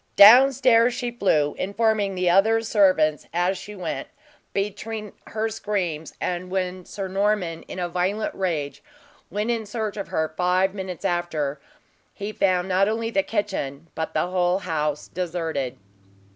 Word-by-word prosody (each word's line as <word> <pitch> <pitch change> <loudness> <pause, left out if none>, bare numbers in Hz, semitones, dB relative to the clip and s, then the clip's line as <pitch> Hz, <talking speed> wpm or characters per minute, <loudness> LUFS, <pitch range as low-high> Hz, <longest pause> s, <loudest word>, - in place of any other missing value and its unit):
Down 245 +7 +9
stairs 245 -2 +4
she 245 -1 -3
flew, 155 -11 +1
informing 205 0 +1
the 180 0 0
other 220 +6 +4
servants 185 -9 +3
as 175 +3 +1
she 210 +3 -9
went, 185 - -4 0.4
between 210 +1 -4
her 220 +1 -1
screams, 190 -8 -3
and 180 0 -3
when 185 -1 -2
Sir 195 -2 -5
Norman, 190 -3 0
in - - -7
a 180 -1 -1
violent 185 +5 -1
rage, 160 -7 -2 0.5
went 210 +3 -1
in 230 -2 -1
search 215 -1 -3
of 200 - -4
her 160 0 -1
five 185 +2 +2
minutes 190 -3 -6
after, 155 -5 -1 0.5
he 205 +1 -4
found 185 -3 +1
not 190 +2 +3
only 225 +1 -2
the 195 - +3
kitchen, 170 -8 -3
but 160 - -4
the - - +2
whole 180 0 +1
house 150 -5 -2
deserted. 165 -7 -3
190 Hz, 150 wpm, -24 LUFS, 175-210 Hz, 0.5 s, Down